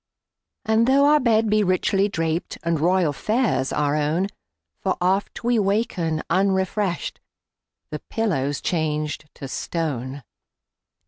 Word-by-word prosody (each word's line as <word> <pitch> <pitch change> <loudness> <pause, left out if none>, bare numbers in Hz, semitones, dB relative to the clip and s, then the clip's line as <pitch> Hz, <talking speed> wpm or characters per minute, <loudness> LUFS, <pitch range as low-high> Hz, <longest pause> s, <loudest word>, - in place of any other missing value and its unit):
And 220 +1 +3
tho 275 +2 +5
our 300 +1 +5
bed 225 -4 +3
be 215 0 +3
richly 195 +2 +2
drapedAnd 165 -1 -2
royal 175 -1 +2
fares 220 - 0
our 150 -1 +1
own, 155 +6 0 0.5
For 190 - -1
oft 190 +5 0
we 240 -1 +2
waken 195 -6 0
unrefreshed—The 190 -4 -3
pillow's 145 -11 -1
changed 155 -2 -2
to 135 - -7
stone! 135 -3 -3
180 Hz, 110 wpm, -23 LUFS, 155-215 Hz, 0.5 s, tho